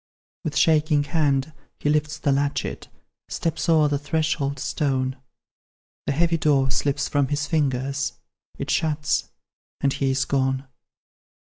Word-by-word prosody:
With 155 Hz, -4 st, -2 dB
shaking 155 Hz, -2 st, +4 dB
hand, 145 Hz, -1 st, +1 dB, 0.2 s
he -, -, -3 dB
lifts 150 Hz, +1 st, +1 dB
the 145 Hz, -, +1 dB
latchet, 140 Hz, +1 st, -1 dB, 0.4 s
Steps 165 Hz, +1 st, -2 dB
o'er 155 Hz, -2 st, +5 dB
the 145 Hz, -1 st, 0 dB
threshold 145 Hz, -1 st, -1 dB
stone; 130 Hz, -1 st, -1 dB, 0.9 s
The -, -, +2 dB
heavy 165 Hz, +3 st, +2 dB
door 140 Hz, -4 st, +2 dB
slips 140 Hz, +1 st, 0 dB
from 145 Hz, -2 st, +1 dB
his 145 Hz, +1 st, -1 dB
fingers 135 Hz, -3 st, 0 dB, 0.4 s
It -, -, -3 dB
shuts, 155 Hz, -1 st, 0 dB, 0.5 s
and 140 Hz, -1 st, +1 dB
he 135 Hz, -, 0 dB
is 130 Hz, 0 st, +1 dB
gone. 135 Hz, 0 st, 0 dB
145 Hz, 130 wpm, -24 LUFS, 135-155 Hz, 0.9 s, o'er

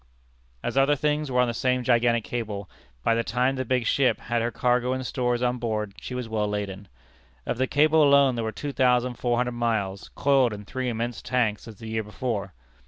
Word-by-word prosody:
As 135 Hz, -, 0 dB
other 140 Hz, +2 st, +4 dB
things 150 Hz, +1 st, 0 dB
were 125 Hz, -1 st, +1 dB
on 125 Hz, -, +2 dB
the 120 Hz, -, -2 dB
same 125 Hz, +2 st, 0 dB
gigantic 120 Hz, -2 st, +2 dB
scale, 105 Hz, -5 st, -4 dB, 0.4 s
by -, -, +3 dB
the 115 Hz, 0 st, +1 dB
time 125 Hz, +4 st, +1 dB
the 130 Hz, -, -2 dB
big 125 Hz, -1 st, 0 dB
ship 135 Hz, +3 st, +2 dB
had 120 Hz, 0 st, -1 dB
her 115 Hz, -, 0 dB
cargo 125 Hz, +1 st, +1 dB
and 130 Hz, 0 st, -3 dB
stores 125 Hz, 0 st, -1 dB
on 125 Hz, 0 st, 0 dB
board, 105 Hz, -3 st, -2 dB
she 125 Hz, -, -6 dB
was 125 Hz, -2 st, -4 dB
well 110 Hz, -2 st, -1 dB
laden. 100 Hz, -1 st, -4 dB, 0.6 s
Of 120 Hz, -, -3 dB
the 130 Hz, -, +2 dB
cable 155 Hz, +3 st, +4 dB
alone 140 Hz, -2 st, +5 dB
there 115 Hz, -1 st, -2 dB
were 110 Hz, -, -2 dB
two 145 Hz, +6 st, -5 dB
thousand 125 Hz, -1 st, +2 dB
four 120 Hz, -1 st, +1 dB
hundred 125 Hz, 0 st, 0 dB
miles, 110 Hz, -5 st, -2 dB
coiled 135 Hz, -4 st, +3 dB
in 105 Hz, 0 st, -8 dB
three 130 Hz, +3 st, -3 dB
immense 120 Hz, 0 st, -3 dB
tanks 120 Hz, -4 st, -1 dB
as 110 Hz, -, -9 dB
the 110 Hz, +3 st, -10 dB
year 110 Hz, 0 st, -1 dB
before. 105 Hz, -2 st, -4 dB
120 Hz, 215 wpm, -26 LUFS, 110-130 Hz, 0.6 s, alone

